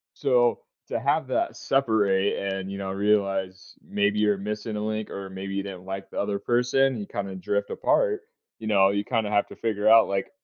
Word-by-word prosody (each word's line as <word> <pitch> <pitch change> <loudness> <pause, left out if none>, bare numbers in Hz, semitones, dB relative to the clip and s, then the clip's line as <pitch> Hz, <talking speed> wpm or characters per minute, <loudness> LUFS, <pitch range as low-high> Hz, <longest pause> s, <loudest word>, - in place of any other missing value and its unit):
So 485 -2 +2 0.3
to - - -1
have - - +1
that 345 0 -1
separate 105 -7 +2
and, 95 -1 -3
you 100 - -5
know, 95 -1 -4
realize 95 -2 0
maybe 105 +1 +1
you're 105 -2 +2
missing 105 +2 -4
a - - -2
link 110 0 -3
or 95 -1 -6
maybe 95 +1 -6
you 100 - -1
didn't 95 -2 -8
like 95 0 -6
the - - -6
other 100 0 -1
person, 125 +3 +2
you 100 -2 -5
kinda 100 -1 -4
drift 100 +2 -2
apart. 430 -5 +1 0.4
You 110 - -8
know, 100 -2 +5
you 100 +1 -1
kinda 110 -3 -1
have 105 -1 +2
to - - -11
figure 110 -3 0
out, 115 0 +7
like, 100 0 -2
100 Hz, 200 wpm, -26 LUFS, 95-110 Hz, 0.4 s, out